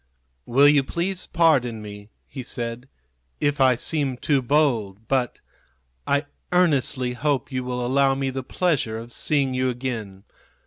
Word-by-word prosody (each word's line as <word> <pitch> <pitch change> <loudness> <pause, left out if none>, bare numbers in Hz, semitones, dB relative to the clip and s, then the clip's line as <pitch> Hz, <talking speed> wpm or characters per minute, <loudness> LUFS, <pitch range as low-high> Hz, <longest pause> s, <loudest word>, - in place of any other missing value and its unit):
"Will 135 +4 +5
you 145 -1 +5
please 180 +6 -3
pardon 135 -9 +2
me," 105 0 -10 0.2
he 135 - -8
said, 120 +1 -5 0.5
"if 145 -1 0
I 130 -2 +5
seem 135 0 -1
too 140 +1 +1
bold; 115 -7 0
but 130 -2 -1 0.7
I 140 +1 +1 0.3
earnestly 140 -7 +2
hope 140 +2 -1
you 130 -1 -2
will 125 -1 -3
allow 135 +1 +3
me 135 -1 -1
the 130 0 -4
pleasure 130 -6 -1
of 115 +1 -9
seeing 140 -3 +1
you 130 0 +1
again. 115 -6 -5
130 Hz, 145 wpm, -23 LUFS, 120-145 Hz, 0.7 s, Will